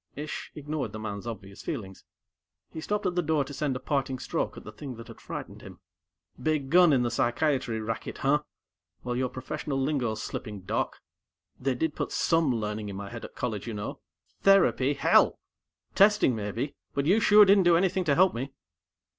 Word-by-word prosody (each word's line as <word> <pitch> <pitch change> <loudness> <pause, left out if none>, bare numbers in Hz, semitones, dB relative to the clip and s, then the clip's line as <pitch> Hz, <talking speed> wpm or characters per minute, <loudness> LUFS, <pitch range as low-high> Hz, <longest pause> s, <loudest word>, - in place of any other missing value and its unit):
Ish 150 +2 -6
ignored 150 -6 -4
the 110 - -5
man's 105 0 -5
obvious 100 -4 -8
feelings. 100 - -6 0.7
He 160 - -6
stopped 210 +4 -2
at 180 - +1
the 175 - +1
door 155 -3 +1
to 145 - -9
send 140 -2 -1
a - - -3
parting 135 -1 -1
stroke - - -3
at - - -9
the 105 - -9
thing 130 +3 -8
that 115 0 -11
had - - -12
frightened - - -7
him. - - -12 0.6
"Big 150 -4 0
gun 175 -1 +7
in 130 -3 +3
the 120 - -1
psychiatry 120 -1 0
racket, 110 +1 -4
huh? 145 +2 +2 0.6
Well, 125 0 -2
your 130 0 0
professional 135 +2 -4
lingo's 130 -6 -1
slipping, 105 -2 -6
Doc. 95 - -2 0.6
They 130 0 0
did 155 +4 -1
put - - -3
some 165 -4 +2
learning 105 -1 -3
in 100 - -6
my 100 +1 -7
head 115 -1 -7
at - - -9
college, 110 -3 -3
you 115 - -4
know. 105 0 -5 0.4
Therapy, 170 -8 +4
hell! - - +4 0.6
Testing 200 - +5
maybe, 110 +6 -3 0.2
but 140 - 0
you 195 +8 +4
sure 210 -1 +7
didn't 195 -1 +5
do 170 -1 +6
anything 185 +1 +1
to 145 -3 +3
help 185 +2 +5
me!" 130 +4 -4
135 Hz, 190 wpm, -28 LUFS, 115-155 Hz, 0.7 s, gun